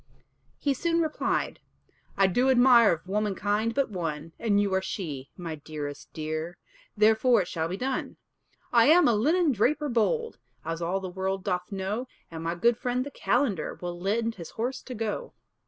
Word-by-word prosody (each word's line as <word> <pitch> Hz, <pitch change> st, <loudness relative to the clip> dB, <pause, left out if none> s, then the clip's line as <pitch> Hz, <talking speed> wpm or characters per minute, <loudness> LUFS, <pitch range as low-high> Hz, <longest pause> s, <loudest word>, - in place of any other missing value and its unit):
He 285 Hz, -, +1 dB
soon 335 Hz, +5 st, 0 dB
replied, 315 Hz, -2 st, -1 dB, 0.6 s
"I 195 Hz, -, +5 dB
do 245 Hz, +8 st, +2 dB
admire 245 Hz, -3 st, +6 dB
Of 165 Hz, +1 st, -3 dB
womankind 210 Hz, +2 st, 0 dB
but 275 Hz, -4 st, +1 dB
one, 165 Hz, -4 st, -4 dB
And 205 Hz, -3 st, +2 dB
you 200 Hz, -2 st, +1 dB
are 190 Hz, -, +2 dB
she, 150 Hz, -9 st, -5 dB
my 170 Hz, -3 st, -5 dB
dearest 145 Hz, -1 st, -7 dB
dear. 155 Hz, +2 st, -4 dB, 0.4 s
Therefore 220 Hz, +1 st, +4 dB
it -, -, -11 dB
shall 160 Hz, -1 st, -2 dB
be 180 Hz, +3 st, -4 dB
done. 260 Hz, +3 st, -3 dB, 0.6 s
"I 235 Hz, 0 st, +6 dB
am 330 Hz, +2 st, +6 dB
a 240 Hz, -, +4 dB
linen 310 Hz, +9 st, +3 dB
draper 280 Hz, +6 st, +1 dB
bold, 460 Hz, -, 0 dB, 0.3 s
As 165 Hz, +1 st, -3 dB
all 180 Hz, +3 st, -1 dB
the 190 Hz, -, -4 dB
world 190 Hz, +1 st, -2 dB
doth 180 Hz, -1 st, -2 dB
know, 200 Hz, +6 st, -3 dB, 0.2 s
And 165 Hz, 0 st, -6 dB
my 165 Hz, +1 st, -1 dB
good 235 Hz, +6 st, +3 dB
friend 250 Hz, +1 st, -1 dB
the 285 Hz, -, -7 dB
calender 210 Hz, -, 0 dB
Will 175 Hz, -1 st, -5 dB
lend 225 Hz, +5 st, 0 dB
his 165 Hz, -, -7 dB
horse 245 Hz, +4 st, -3 dB
to 255 Hz, -, -8 dB
go." 225 Hz, -, -3 dB
205 Hz, 175 wpm, -27 LUFS, 175-250 Hz, 0.6 s, admire